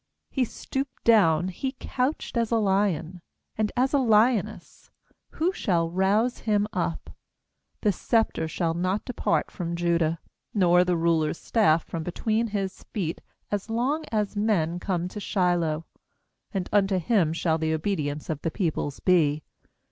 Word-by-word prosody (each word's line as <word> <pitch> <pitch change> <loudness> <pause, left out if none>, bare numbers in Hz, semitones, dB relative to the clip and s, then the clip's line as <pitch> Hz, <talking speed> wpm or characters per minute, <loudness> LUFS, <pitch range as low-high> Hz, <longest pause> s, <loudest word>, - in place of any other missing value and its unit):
He 260 -3 +1
stooped 270 +3 -5
down, 185 -6 +4
he 260 +9 -4
couched 260 +3 -2
as 230 -2 +1
a 235 - +1
lion, 190 -5 0 0.3
And 215 -1 0
as 260 +3 +2
a 285 - +4
lioness; 225 -2 +1 0.4
who 345 +4 0
shall 170 - 0
rouse 205 +7 +1
him 210 -2 +1
up? 170 -2 -3 0.7
10The 210 -3 +3
sceptre 220 -6 0
shall 165 +1 -1
not 185 +4 -1
depart 250 - -1
from 170 -3 -4
Judah, 170 -1 +1 0.4
Nor 180 -2 +5
the 180 -1 +1
ruler's 165 -1 +1
staff 170 -8 +2
from 165 - -4
between 220 +7 -1
his 195 -3 -3
feet, 170 -6 -4 0.3
As 205 +1 -2
long 260 +8 0
as 210 -2 -1
men 180 -6 +1
come 180 -2 -1
to 210 - -7
Shiloh; 175 -5 0 0.7
And 190 -4 -2
unto 195 -2 +3
him 180 -2 +2
shall 165 -1 0
the 160 0 0
obedience 155 -4 -2
of 155 -3 -3
the - - -1
peoples 155 -4 -2
be. 155 -5 +3
185 Hz, 150 wpm, -26 LUFS, 165-220 Hz, 0.7 s, Nor